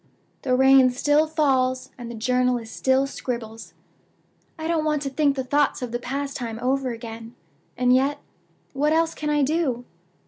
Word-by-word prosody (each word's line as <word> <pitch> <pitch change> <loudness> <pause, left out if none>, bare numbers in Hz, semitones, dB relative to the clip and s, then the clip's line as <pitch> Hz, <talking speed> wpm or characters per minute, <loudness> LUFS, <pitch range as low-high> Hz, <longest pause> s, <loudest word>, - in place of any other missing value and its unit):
"The 255 -2 +1
rain 265 0 +6
still 290 +5 +2
falls, 265 -4 +1
and 240 -2 -8
the 235 - -7
journalist 250 0 0
still 265 +1 +2
scribbles. 235 -4 -6 0.8
I 320 0 -4
don't 330 -2 +1
want 300 -2 0
to 275 - -3
think 285 0 +2
the 265 - -2
thoughts 285 0 +1
of 245 - -4
that 240 +1 -3
past 275 +2 -4
time 230 -3 -4
over 260 +1 0
again. 230 0 -8 0.4
And 250 0 +3
yet, 275 +3 +2 0.5
what 295 +3 +1
else 325 0 +2
can 300 - -4
I 295 -1 +2
do? 270 -5 0
265 Hz, 170 wpm, -24 LUFS, 245-290 Hz, 0.8 s, rain